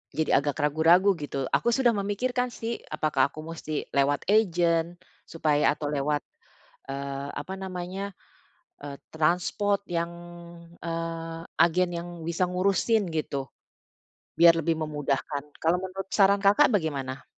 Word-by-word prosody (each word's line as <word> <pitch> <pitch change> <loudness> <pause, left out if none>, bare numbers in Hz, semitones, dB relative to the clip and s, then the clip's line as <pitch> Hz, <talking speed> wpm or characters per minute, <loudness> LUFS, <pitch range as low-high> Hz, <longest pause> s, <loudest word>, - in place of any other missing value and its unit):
jadi 155 -3 +3
agak 145 -1 -2
ragu-ragu, 165 +6 +4
gitu. 140 -2 -3
Aku 235 - +2
sudah 255 0 +4
memikirkan 245 +5 -1
sih, 230 +1 -4
apakah 140 -3 +2
aku 155 - -7
mesti 160 -2 -5
lewat 140 +1 +2
agen 175 -5 +2 0.3
supaya 150 -3 +2
atau 150 -1 -5
lewat, 145 0 0 0.7
eee, 140 0 -4
apa 190 - -5
namanya, 190 +1 -5 0.7
eee, 145 -1 -6 0.2
transpor 180 +5 +1
yang, 170 -1 -1 0.7
eee, 165 0 -4 0.2
agen 175 +2 +4
yang 170 +1 -5 0.2
bisa 170 +2 +1
ngurusin, 195 +3 +1
gitu, 140 -3 -3 0.9
biar 170 0 +8
lebih 165 -1 0
memudahkan, 145 -1 -2 0.2
kalau 165 +2 +3
menurut 190 0 -6
saran 200 0 +5
Kakak 205 +10 +5
bagaimana? 140 -7 -2
165 Hz, 125 wpm, -27 LUFS, 150-190 Hz, 0.9 s, biar